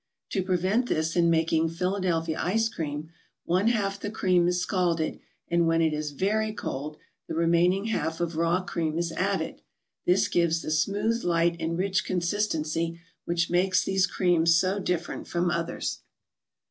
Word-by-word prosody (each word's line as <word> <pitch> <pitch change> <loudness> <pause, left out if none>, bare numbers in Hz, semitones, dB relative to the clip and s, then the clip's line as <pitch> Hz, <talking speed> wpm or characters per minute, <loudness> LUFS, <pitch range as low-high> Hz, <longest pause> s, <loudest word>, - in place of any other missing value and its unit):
To 195 - 0
prevent 185 +6 +1
this 160 +1 0
in 170 -1 +4
making 165 0 +2
Philadelphia 170 -2 -1
Ice 225 +5 +1
Cream, 155 -5 -5 0.3
one 185 +5 +2
half 200 -4 0
the 205 - -4
cream 185 -5 +2
is 180 0 +1
scalded, 175 -3 0 0.3
and 170 -1 +2
when 165 0 +3
it 160 -1 +2
is 150 0 -2
very 215 +8 0
cold, 150 -5 -5 0.3
the - - -4
remaining 170 +4 +3
half 165 -7 -2
of 170 -1 -2
raw 170 +3 +1
cream 160 -3 -2
is 170 -1 -1
added. - - -2 0.5
This 195 +3 +4
gives 170 -4 +1
the - - -3
smooth, 205 +9 0
light 170 0 +2
and 165 0 -2
rich 190 +2 +1
consistency 170 -3 -1 0.3
which 170 0 0
makes 180 +1 +3
these 190 -1 +2
creams 170 -3 +3
so 185 +3 +2
different 175 -3 -3
from 175 0 0
others. 170 -1 -2
175 Hz, 160 wpm, -27 LUFS, 165-190 Hz, 0.5 s, in